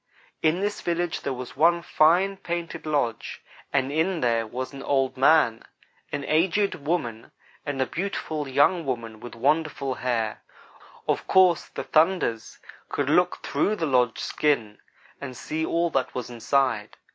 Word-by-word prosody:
"In 165 Hz, +4 st, +2 dB
this 205 Hz, 0 st, -2 dB
village 175 Hz, 0 st, -1 dB
there 140 Hz, -, -2 dB
was 125 Hz, -1 st, -6 dB
one 170 Hz, +2 st, +3 dB
fine, 180 Hz, +6 st, +3 dB
painted 170 Hz, -3 st, -5 dB
lodge, 140 Hz, -7 st, -2 dB, 0.3 s
and 135 Hz, -1 st, +1 dB
in 165 Hz, +5 st, +1 dB
it -, -, -4 dB
there 115 Hz, -2 st, +1 dB
was 130 Hz, +4 st, -5 dB
an 135 Hz, -, -8 dB
old 135 Hz, -2 st, 0 dB
man, 135 Hz, -4 st, +4 dB, 0.5 s
an 140 Hz, -, -3 dB
aged 185 Hz, +6 st, +2 dB
woman, 140 Hz, -8 st, -3 dB, 0.4 s
and 145 Hz, -2 st, -2 dB
a 130 Hz, -, +2 dB
beautiful 160 Hz, -4 st, -3 dB
young 145 Hz, +6 st, +3 dB
woman 115 Hz, -5 st, -4 dB
with 120 Hz, +1 st, -9 dB
wonderful 140 Hz, +1 st, 0 dB
hair. 115 Hz, -4 st, -2 dB, 0.7 s
Of -, -, -1 dB
course 185 Hz, -3 st, +4 dB
the -, -, -6 dB
'thunders' 155 Hz, -, +1 dB, 0.3 s
could -, -, -1 dB
look -, -, +2 dB
through 210 Hz, -, 0 dB
the 170 Hz, -, -2 dB
lodge 125 Hz, -5 st, +2 dB
skin 115 Hz, -9 st, 0 dB, 0.4 s
and 130 Hz, -3 st, -7 dB
see 160 Hz, +1 st, -3 dB
all 170 Hz, +1 st, 0 dB
that 130 Hz, -, -1 dB
was 125 Hz, -1 st, -4 dB
inside. 120 Hz, -2 st, 0 dB
145 Hz, 155 wpm, -25 LUFS, 125-170 Hz, 0.7 s, man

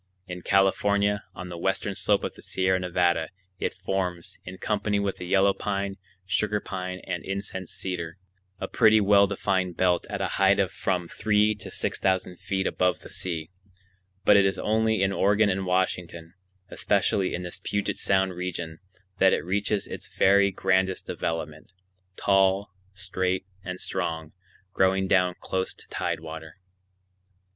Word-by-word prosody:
In 90 Hz, -1 st, -7 dB
California, 100 Hz, +2 st, +2 dB
on 90 Hz, -1 st, -7 dB
the 85 Hz, -1 st, -7 dB
western 95 Hz, +2 st, -1 dB
slope 100 Hz, +2 st, +1 dB
of -, -, -3 dB
the -, -, -15 dB
Sierra 95 Hz, 0 st, +1 dB
Nevada, 85 Hz, -2 st, +1 dB, 0.3 s
it -, -, -2 dB
forms, 90 Hz, -3 st, -3 dB
in 95 Hz, +1 st, -8 dB
company 105 Hz, +1 st, 0 dB
with 100 Hz, -1 st, -1 dB
the 90 Hz, -, -7 dB
yellow 100 Hz, +1 st, +4 dB
pine, 100 Hz, -1 st, -3 dB, 0.3 s
sugar 105 Hz, +3 st, +1 dB
pine, 90 Hz, -2 st, -5 dB
and 90 Hz, -2 st, -3 dB
incense 95 Hz, -2 st, -5 dB
cedar, 85 Hz, -2 st, -4 dB, 0.4 s
a -, -, -3 dB
pretty 110 Hz, 0 st, +5 dB
well 100 Hz, -1 st, +5 dB
defined 95 Hz, -2 st, -1 dB
belt 90 Hz, -1 st, +2 dB
at 100 Hz, -1 st, -3 dB
a 95 Hz, -, 0 dB
height 95 Hz, +1 st, +5 dB
of 95 Hz, -1 st, +2 dB
from 90 Hz, -2 st, -1 dB
three 105 Hz, +2 st, +2 dB
to 105 Hz, -2 st, -8 dB
six -, -, -2 dB
thousand 95 Hz, -2 st, 0 dB
feet 95 Hz, -1 st, -2 dB
above 90 Hz, -2 st, +1 dB
the -, -, -11 dB
sea; 80 Hz, -2 st, -4 dB, 0.7 s
but 105 Hz, -, +7 dB
it 100 Hz, -, +6 dB
is 95 Hz, 0 st, +1 dB
only 110 Hz, -1 st, +1 dB
in 95 Hz, -, +2 dB
Oregon 105 Hz, +1 st, +3 dB
and 95 Hz, 0 st, -2 dB
Washington, 90 Hz, -2 st, -1 dB, 0.4 s
especially 95 Hz, -2 st, +1 dB
in 90 Hz, -, -4 dB
this 90 Hz, -, -6 dB
Puget 100 Hz, -1 st, -1 dB
Sound 95 Hz, -1 st, +2 dB
region, 85 Hz, -2 st, -5 dB, 0.4 s
that 95 Hz, 0 st, +6 dB
it -, -, -1 dB
reaches 100 Hz, +2 st, 0 dB
its -, -, -7 dB
very 100 Hz, +1 st, +5 dB
grandest 95 Hz, 0 st, +1 dB
development,—tall, 95 Hz, +4 st, -1 dB, 0.2 s
straight, 95 Hz, -1 st, -2 dB, 0.2 s
and 90 Hz, -1 st, -5 dB
strong, 80 Hz, -4 st, -3 dB, 0.4 s
growing 95 Hz, 0 st, +2 dB
down 90 Hz, -2 st, +3 dB
close 95 Hz, 0 st, -2 dB
to -, -, -13 dB
tidewater. 80 Hz, -1 st, -4 dB
95 Hz, 150 wpm, -26 LUFS, 90-100 Hz, 0.7 s, but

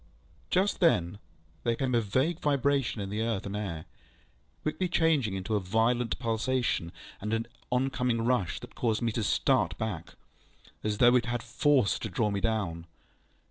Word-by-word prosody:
Just 190 Hz, +3 st, +2 dB
then 95 Hz, -, +2 dB, 0.4 s
there 115 Hz, -1 st, +1 dB
came 130 Hz, +1 st, -1 dB
a 120 Hz, -, +4 dB
vague 130 Hz, -, 0 dB
vibration 140 Hz, -4 st, +1 dB
in 100 Hz, 0 st, -4 dB
the 105 Hz, +2 st, -1 dB
earth 115 Hz, -4 st, -1 dB
and 100 Hz, 0 st, -4 dB
air, 85 Hz, -7 st, -4 dB, 0.8 s
quickly 165 Hz, +4 st, -1 dB
changing 155 Hz, -, +2 dB
into 95 Hz, +3 st, -3 dB
a -, -, +3 dB
violent 115 Hz, +5 st, +1 dB
pulsation, 115 Hz, -6 st, 0 dB, 0.3 s
and 105 Hz, +2 st, -2 dB
an 115 Hz, 0 st, 0 dB, 0.2 s
oncoming 125 Hz, -2 st, 0 dB
rush 120 Hz, -9 st, +1 dB
that -, -, -11 dB
caused 115 Hz, -1 st, 0 dB
me 115 Hz, -, +1 dB
to 115 Hz, -, -2 dB
start 85 Hz, -4 st, +2 dB
back, 95 Hz, -7 st, -4 dB, 0.7 s
as 105 Hz, -1 st, -1 dB
though 120 Hz, +2 st, +6 dB
it 125 Hz, -1 st, +2 dB
had 120 Hz, -1 st, -2 dB
force 125 Hz, -1 st, +2 dB
to 110 Hz, -, -4 dB
draw 105 Hz, +3 st, 0 dB
me 100 Hz, -1 st, -2 dB
down. 95 Hz, -7 st, -1 dB
115 Hz, 165 wpm, -29 LUFS, 105-125 Hz, 0.8 s, though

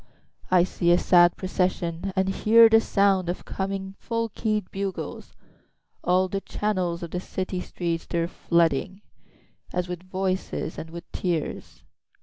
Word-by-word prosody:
3I 180 Hz, -1 st, +5 dB
see 175 Hz, -1 st, -1 dB
a 175 Hz, -, +6 dB
sad 175 Hz, -1 st, +5 dB
procession, 185 Hz, -1 st, -1 dB
And 190 Hz, 0 st, +2 dB
I -, -, +1 dB
hear 225 Hz, +3 st, +6 dB
the 225 Hz, 0 st, +6 dB
sound 195 Hz, -4 st, +2 dB
of 175 Hz, -, -4 dB
coming 195 Hz, 0 st, -4 dB
full 230 Hz, -1 st, -2 dB
key'd 215 Hz, -2 st, -2 dB
bugles; 195 Hz, -1 st, -5 dB, 0.7 s
All 185 Hz, +1 st, +3 dB
the 195 Hz, +1 st, -3 dB
channels 185 Hz, -4 st, -2 dB
of 170 Hz, -, -6 dB
the 180 Hz, -, -2 dB
city 185 Hz, 0 st, -4 dB
streets 170 Hz, -2 st, -3 dB
they're 170 Hz, 0 st, 0 dB
flooding, 170 Hz, +2 st, 0 dB, 0.7 s
As 180 Hz, 0 st, -1 dB
with 180 Hz, -1 st, -5 dB
voices 185 Hz, -2 st, -3 dB
and 160 Hz, -, -7 dB
with 170 Hz, +1 st, -8 dB
tears. 170 Hz, -5 st, -3 dB
185 Hz, 145 wpm, -25 LUFS, 175-195 Hz, 0.7 s, a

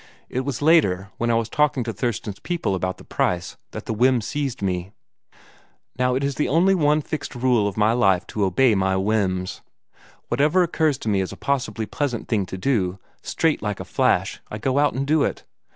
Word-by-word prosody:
It 125 Hz, -, -2 dB
was 130 Hz, 0 st, -3 dB
later, 100 Hz, -, +3 dB
when 120 Hz, -, 0 dB
I 115 Hz, -, +3 dB
was 115 Hz, -1 st, 0 dB
talking 145 Hz, 0 st, +1 dB
to 115 Hz, -1 st, -4 dB
Thurston's 105 Hz, -2 st, -3 dB
people 170 Hz, -, -2 dB
about 95 Hz, 0 st, -2 dB
the -, -, -13 dB
price, 85 Hz, -1 st, -2 dB
that -, -, -8 dB
the -, -, -2 dB
whim 125 Hz, +3 st, +3 dB
seized 135 Hz, 0 st, -3 dB
me. 90 Hz, 0 st, -2 dB, 1.1 s
Now 125 Hz, 0 st, +2 dB
it 135 Hz, -, -1 dB
is 140 Hz, 0 st, 0 dB
the 150 Hz, -, -1 dB
one 160 Hz, -2 st, +3 dB
fixed 155 Hz, -, -5 dB
rule 120 Hz, -4 st, +2 dB
of 100 Hz, -, -5 dB
my 110 Hz, +1 st, +3 dB
life 95 Hz, -7 st, +3 dB
to 105 Hz, -, 0 dB
obey 110 Hz, +6 st, +3 dB
my 95 Hz, -1 st, +1 dB
whims. 95 Hz, -2 st, -1 dB, 0.7 s
Whatever 155 Hz, +6 st, +3 dB
occurs 160 Hz, -4 st, +1 dB
to -, -, -8 dB
me 100 Hz, -2 st, +2 dB
as 95 Hz, -, -3 dB
a -, -, -9 dB
possibly 130 Hz, -5 st, -1 dB
pleasant 130 Hz, -1 st, -3 dB
thing 100 Hz, -5 st, 0 dB
to 95 Hz, -, -6 dB
do, 95 Hz, -5 st, 0 dB, 0.2 s
straight 165 Hz, -2 st, 0 dB
like 105 Hz, -1 st, -3 dB
a -, -, -6 dB
hash, -, -, +2 dB
I 105 Hz, -, -5 dB
go 130 Hz, +5 st, 0 dB
and 140 Hz, -2 st, +1 dB
do 155 Hz, +1 st, +2 dB
it. -, -, -1 dB
120 Hz, 200 wpm, -23 LUFS, 100-140 Hz, 1.1 s, later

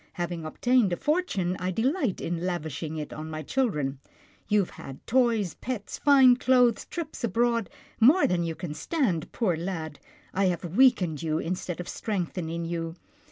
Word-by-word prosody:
Having 175 Hz, -2 st, -4 dB
obtained 240 Hz, +5 st, +2 dB
a -, -, -1 dB
fortune, 295 Hz, -, 0 dB
I 180 Hz, +1 st, -2 dB
delight 250 Hz, -, 0 dB
in 170 Hz, 0 st, -3 dB
lavishing 160 Hz, -3 st, -3 dB
it 150 Hz, -1 st, -5 dB
on 155 Hz, +1 st, -6 dB
my 155 Hz, 0 st, -5 dB
children. 150 Hz, -, -1 dB, 0.5 s
You 210 Hz, -1 st, +4 dB
have 185 Hz, -, -5 dB
had 135 Hz, -1 st, -10 dB
toys, 230 Hz, -7 st, +2 dB
pets, 245 Hz, -5 st, -5 dB
fine 265 Hz, -4 st, +6 dB
clothes, 250 Hz, -4 st, +3 dB
trips 320 Hz, -6 st, -6 dB
abroad 235 Hz, 0 st, +1 dB, 0.2 s
— -, -, -27 dB
more 280 Hz, +11 st, +6 dB
than 175 Hz, -1 st, +1 dB
you 165 Hz, -1 st, -3 dB
can 165 Hz, -3 st, -5 dB
stand, 200 Hz, -, -1 dB
poor 200 Hz, -8 st, 0 dB
lad. 160 Hz, -3 st, -5 dB, 0.3 s
I 195 Hz, +1 st, +2 dB
have 180 Hz, -1 st, 0 dB
weakened 200 Hz, -, +4 dB
you, 155 Hz, -1 st, 0 dB
instead 175 Hz, 0 st, -3 dB
of 180 Hz, -, -5 dB
strengthening 170 Hz, -5 st, -3 dB
you. 165 Hz, -1 st, -3 dB
180 Hz, 165 wpm, -27 LUFS, 165-240 Hz, 0.5 s, fine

